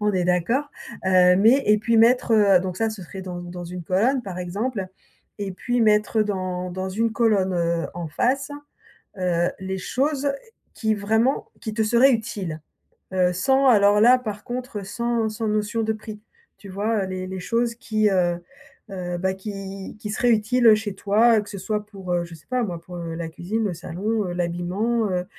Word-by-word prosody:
on 210 -1 +1
est 180 -2 0
d'accord. 230 - +1 0.3
Heu, 180 -1 +5
mais 235 +8 +5
et 210 - +5
puis 230 +2 +1
mettre, 240 +1 +4
heu 200 -4 +5
donc 185 -1 -4
ça 225 - +1
se 215 -3 -8
serait 190 +2 -8
dans 180 -1 -6
dans 175 0 -7
une 180 +1 -7
colonne 230 - +1
par 190 -5 -6
exemple 195 +3 -3 0.5
et 200 -1 -3
puis 245 +6 -1
mettre, 210 0 +3
heu, 215 - +3
dans 185 -3 -3
dans 185 +1 -4
une 220 +4 0
colonne, 210 -5 +2
heu, 170 -1 0
en 170 -1 -4
face, 265 - 0 0.7
heu, 175 -1 +1
les 190 0 -4
choses 280 +7 0 0.4
qui 220 -1 0
vraiment 220 +6 +1
qui 220 - -5
te 225 - +1
seraient 240 +5 +5
utiles. 200 -8 -3 0.5
Heu, 180 -1 +2
sans 265 +9 +2
alors 205 -2 +5
là 245 +3 +7
par 210 -4 -6
contre, 245 -2 -5
heu, - - -8
sans 235 +2 -1
sans 215 +1 -4
notion 215 +2 0
de 220 0 0
prix. 215 -1 -9 0.4
Tu 200 - -12
vois? 205 +1 -1
Heu, - - -4
les 185 0 -4
les 190 0 -6
choses 230 +4 0
qui, 215 -3 0
heu 175 -2 +1 0.5
heu, 180 -2 -4
bah, 190 +1 0
qui 195 0 -7
qui 210 - -5
seraient 240 +3 +1
utiles, 230 +3 +2
heu, 220 - +9
chez 210 -2 -4
toi, 220 +4 +4
heu, 210 - 0
que 205 - -12
ce 200 - -6
soit 210 +2 -3
pour, 190 -4 -6
heu, 175 -1 +1
je 170 - -11
sais 155 - -16
pas 255 -1 +1
moi 175 -5 -5
pour, 180 +1 -10
heu, 170 -1 -5
la 165 -1 -4
cuisine, 185 +7 -3
le 200 - -1
salon, 200 +6 -2
heu, - - -3
l'habillement, 180 +6 -1
heu 180 0 -1
205 Hz, 205 wpm, -23 LUFS, 180-225 Hz, 0.7 s, heu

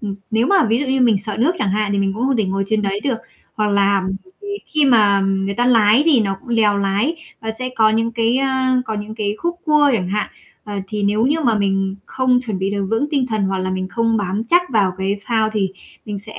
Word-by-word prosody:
ừm, 200 -3 -4 0.2
nếu 225 +3 +2
mà 390 -4 +4
ví 230 +2 +2
dụ 285 - -2
như 265 0 0
mình 230 -5 +4
sợ 205 0 -6
nước 290 +9 +3
chẳng 195 - 0
hạn, 210 0 0
thì 200 - 0
mình 195 -1 +1
cũng 240 +4 -1
không 270 - +1
thể 220 - +1
ngồi 195 +1 -1
trên 215 -1 +1
đấy 200 0 -2
được, 260 -5 0 0.4
hoặc 210 -1 0
là 200 -1 +2 0.2
bởi 370 - -23
vì 405 - -8 0.3
khi 300 -2 +4
mà 210 -6 +4
người 195 0 -1
ta 245 +3 +1
lái 225 +1 +5
thì 280 -8 +5
nó 195 -2 -1
cũng - - -18
lèo 210 -2 +3
lái 200 +10 0 0.3
và 220 0 -3
sẽ 255 0 -3
có 220 -1 +4
những 225 +1 0
cái, 230 +1 +1
ơ, 270 0 +1 0.4
có 220 - -4
những 210 +1 -6
cái 210 -2 -2
khúc 345 0 -2
cua 300 -2 +4
chẳng 180 -5 -1
hạn, 210 +2 -1 0.4
ờ, 210 - -7
thì 210 -1 -3
nếu 210 +4 +2
như 305 +3 +1
mà 235 -7 +2
mình 195 -1 0
không 255 -1 +1
chuẩn 210 -4 -3
bị 190 +1 -1
được 200 -1 -2
vững 225 +6 +1
tinh 275 -4 +1
thần 215 -4 -2
hoặc 190 0 -1
là 185 0 -2
mình 185 0 -3
không 230 0 0
bám 200 +1 -2
chắc 350 +1 +5
vào 200 -5 +2
cái 195 +2 -1
phao 220 -2 +1
thì 205 -3 0 0.4
mình 205 -1 -5
sẽ 215 +2 -12
mình - - -7
215 Hz, 265 wpm, -19 LUFS, 200-245 Hz, 0.4 s, lái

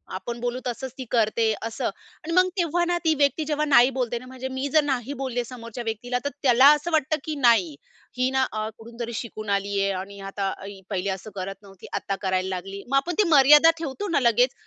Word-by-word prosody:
आपण 235 +5 -5
बोलू 245 +1 -2
तसंच 255 +1 -4
ती 260 - -6
करते, 225 -1 +2
असं. 225 - -5
आणि 325 - -7
मग 365 +1 +5
तेव्हा 345 -1 +1
ना 350 0 0
ती 320 - +4
व्यक्ती 285 +3 +2
जेव्हा 300 0 0
"नाही." 255 -4 +6
बोलते 245 -2 -1
ना 250 - -13
म्हणजे 260 0 -7
मी 260 +1 -3
जर 310 -1 +5
नाही 270 -2 -2
बोलले 245 -2 -2
समोरच्या 235 -1 -8
व्यक्तीला 230 +2 -3
तर - - +1
त्याला 260 0 +6
असं 300 +4 -5
वाटतं 310 -1 +1
की 310 - -4
नाही, 230 - +3 0.4
ही 255 +1 +2
ना 265 0 +2
अ, 215 0 -3
कुठूनतरी 235 +1 -7
शिकून 215 -2 -6
आली 200 0 0
आहे. 195 0 +1
आणि 200 +1 -10
आता 195 -1 -2
ही 200 -1 -9
पहिले 195 -1 -2
असं 190 +2 -5
करत 195 0 -4
नव्हती 195 -2 -14
आता 195 - -2
करायला 185 -1 0
लागली. 195 +2 -7
मग 275 - 0
आपण 335 +6 0
ती 425 - +5
मर्यादा 295 +2 +7
ठेवतो 325 +5 -4
ना 335 - +2
लगेच 245 0 +3
245 Hz, 215 wpm, -24 LUFS, 210-280 Hz, 0.4 s, मर्यादा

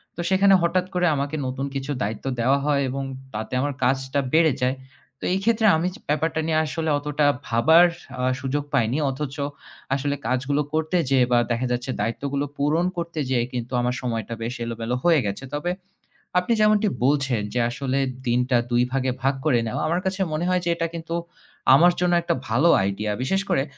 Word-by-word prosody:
তো 175 - -4
সেখানে 195 +1 +5
হঠাৎ 180 +2 +1
করে 180 0 +1
আমাকে 140 +2 -2
নতুন 130 +2 -3
কিছু 135 +1 -3
দায়িত্ব 110 +5 -4
দেওয়া 130 +4 +3
হয় 145 -1 +2
এবং 135 +2 -3 0.3
তাতে 110 +3 -5
আমার 145 +1 -1
কাজটা 130 +2 +1
বেড়ে 160 -2 +5
যায়। 130 +2 +1 0.4
তো - - -11
এই 190 - +1
ক্ষেত্রে 225 0 +3
আমি 165 +3 0
যে - - -13
ব্যাপারটা 155 +1 0
নিয়ে 155 -1 +2
আসলে 160 +2 -2
অতটা 150 0 0 0.2
ভাবার 160 +10 +5 0.3
আ - - -1 0.2
সুযোগ 140 +2 -1
পাইনি। 120 +4 +2
অথচ 135 +1 -5 0.6
আসলে 140 +1 -1
কাজগুলো 135 +3 0
করতে 160 +3 0
যেয়ে 130 -2 +4
বা 120 - +5
দেখা 120 +2 0
যাচ্ছে 125 +2 -2
দায়িত্বগুলো 140 +5 -2
পূরণ 150 +5 +1
করতে 170 -2 -4
যেয়ে 120 -3 +1
কিন্তু 120 -1 -4
আমার 125 +1 0
সময়টা 115 -3 -3
বেশ 120 +2 -3
এলোমেলো 115 +1 -3
হয়ে 170 -3 +5
গেছে। 100 +6 -4
তবে 175 +4 -1 0.7
আপনি 180 +6 0
যেমনটি 215 0 +4 0.2
বলছেন 135 -5 +1
যে 125 - 0
আসলে 135 +2 -2 0.3
দিনটা 125 +1 +2
২ 120 0 +3
ভাগে 130 -1 0
ভাগ 135 +2 +2
করে 130 -6 +3
নেওয়া। 110 - -3
আমার 170 +3 0
কাছে 190 +1 -1
মনে 155 +3 -1
হয় 180 0 +2
যে - - 0
এটা 165 0 -1
কিন্তু 165 0 -4 0.6
আমার 175 +5 +6
জন্য 180 -1 +2
একটা 170 - 0
ভালো 135 +10 +3
আইডিয়া। 100 +2 -2
বিশেষ 195 +9 +1
করে 135 - +2
140 Hz, 185 wpm, -23 LUFS, 125-165 Hz, 0.7 s, আমার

